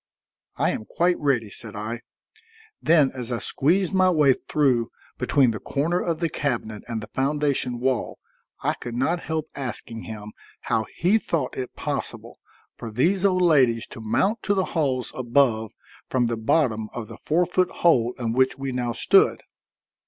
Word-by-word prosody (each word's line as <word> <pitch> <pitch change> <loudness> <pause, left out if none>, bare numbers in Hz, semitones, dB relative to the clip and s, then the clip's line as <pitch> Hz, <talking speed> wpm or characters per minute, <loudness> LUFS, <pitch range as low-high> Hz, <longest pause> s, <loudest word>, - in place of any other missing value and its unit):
"I - - +2
am 110 - -5
quite 175 +7 +1
ready," 125 -8 0
said 110 0 -6
I. 110 +3 -4 0.8
Then 155 -4 +4
as 125 -2 -5
I 120 - 0
squeezed 175 +11 +1
my 185 -1 +4
way 150 -6 +5
through 130 -5 +1 0.3
between 135 -4 +3
the 110 - -5
corner 165 +6 -1
of 165 -1 -2
the 165 - +2
cabinet 120 -8 -3
and 115 -2 -3
the 105 - -10
foundation 135 -3 0
wall, 130 0 -1 0.5
I - - +2
could 120 -1 -7
not 160 +8 +1
help 160 -1 -3
asking 120 -4 -5
him 105 -1 -8 0.3
how 110 -1 -1
he 195 +6 +3
thought 155 -10 -2
it 130 -1 -5
possible - - -5 0.4
for 115 - -6
these 170 - +1
old 185 -2 +3
ladies 130 -9 +4
to 115 - -8
mount 130 - +1
to 205 - +1
the 190 -1 +1
halls 135 -6 0
above 120 -3 +2 0.4
from 125 -2 +2
the 115 0 0
bottom 110 -2 +1
of 115 -3 -5
the - - -10
four 170 +4 +1
foot 180 +1 +1
hole 125 -8 +2
in 115 -2 -2
which 130 +1 +2
we 135 -1 -3
now 125 -1 -2
stood. 115 - +3
130 Hz, 170 wpm, -24 LUFS, 115-160 Hz, 0.8 s, way